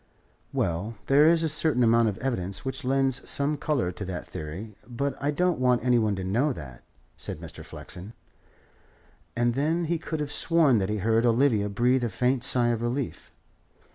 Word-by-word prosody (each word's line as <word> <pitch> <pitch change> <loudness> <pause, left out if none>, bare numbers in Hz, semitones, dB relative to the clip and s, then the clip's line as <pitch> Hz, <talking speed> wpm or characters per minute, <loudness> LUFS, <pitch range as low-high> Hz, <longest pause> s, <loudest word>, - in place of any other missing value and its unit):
"Well, 90 +7 -2
there 145 +3 +5
is 165 0 +4
a - - +2
certain 150 -4 +3
amount 115 0 +4
of 100 - -5
evidence 100 -7 -3
which 130 +1 -4
lends 135 0 0
some 145 +2 +1
colour 140 - -1
to 90 - -7
that 90 -1 -5
theory, 90 +8 -7
but 140 +3 -2
I 140 - 0
don't 175 +2 +1
want 125 -2 +2
any 125 -1 +4
one 105 -2 +1
to 95 - -5
know 120 +11 +1
that," 65 - -10 0.4
said - - -5
Mr. - - -9
Flexen. 95 +6 -8 1.2
And 120 0 +1
then 160 +6 0
he 165 +1 -1
could 160 0 -4
have 150 -1 -3
sworn 155 -7 +3
that 95 0 -1
he 105 - -1
heard 110 +3 +2
Olivia 115 -3 +2
breathe 120 +5 +2
a 120 - 0
faint 125 +4 0
sigh 120 -2 +3
of 115 -1 -1
relief. 120 +3 -3
120 Hz, 185 wpm, -26 LUFS, 105-140 Hz, 1.2 s, there